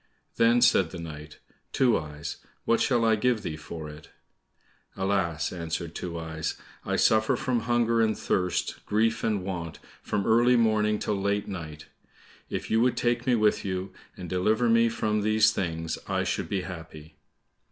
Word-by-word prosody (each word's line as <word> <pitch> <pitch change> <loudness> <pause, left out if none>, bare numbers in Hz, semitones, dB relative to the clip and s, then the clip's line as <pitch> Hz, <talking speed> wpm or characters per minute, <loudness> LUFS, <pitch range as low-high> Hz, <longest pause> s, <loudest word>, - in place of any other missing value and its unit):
Then 120 +1 +4
said 95 -8 +4
the 90 - -8
knight, 75 -3 -9 0.3
"Two 125 -4 +3
eyes, 75 -2 -5 0.3
what 115 - +2
shall 120 -3 +2
I 110 -1 +4
give 115 -1 +1
thee 80 - -3
for 80 0 -8
it?" 75 0 -11 0.9
"Alas!" 95 -6 0
answered 85 -1 -4
Two 85 -2 -5
eyes, 80 -1 -4 0.3
"I - - -1
suffer 110 0 +3
from 130 -5 0
hunger 115 0 +2
and 110 -2 +1
thirst, 90 -1 -1
grief 110 +2 +1
and 105 -4 0
want, 85 -4 -5 0.2
from 100 -2 -2
early 120 +2 +4
morning 110 -2 +2
till 105 -1 -2
late 100 +1 0
night; 75 -5 -7 0.6
if - - -4
you 115 - +3
would 125 0 +2
take 120 0 0
me 125 - +4
with 105 -2 +2
you, 95 0 -4 0.2
and 90 - -7
deliver 105 +7 +1
me 115 0 +4
from 105 -1 -1
these 110 +1 +4
things, 80 -5 -3
I - - 0
should - - -2
be 100 -2 -1
happy." 80 -4 -10
100 Hz, 165 wpm, -27 LUFS, 85-115 Hz, 0.9 s, Then